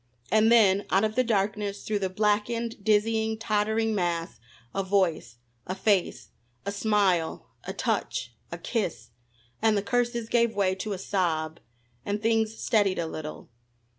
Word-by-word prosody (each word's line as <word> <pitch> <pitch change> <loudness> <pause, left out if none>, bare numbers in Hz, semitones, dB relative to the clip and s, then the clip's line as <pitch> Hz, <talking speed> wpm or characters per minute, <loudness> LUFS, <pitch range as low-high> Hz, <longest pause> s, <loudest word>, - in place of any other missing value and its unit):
And 220 +1 +5
then, 205 -4 +5
out 195 +2 +3
of 215 0 +1
the 255 +3 +2
darkness, 205 -2 -1
through 210 -1 -1
the 190 -1 -1
blackened, 215 +3 0
dizzying, 220 +1 +2
tottering 220 0 0
mass 170 - -2 0.3
a 195 - 0
voice, 185 - 0 0.3
a 185 - -2
face, 195 -2 0 0.4
a 200 - -1
smile, 200 -5 +1 0.2
a - - -4
touch, - - -2 0.2
a - - -4
kiss, 170 - -3 0.5
and 220 -1 +3
the 200 - 0
curses 240 -1 0
gave 235 -1 +2
way 195 -2 +2
to 200 +2 -4
a - - -4
sob 170 -4 -1 0.4
and 205 +1 -2
things 225 0 +1
steadied 205 -4 +2
a 170 - -1
little. 155 -1 -7
205 Hz, 150 wpm, -27 LUFS, 190-220 Hz, 0.5 s, And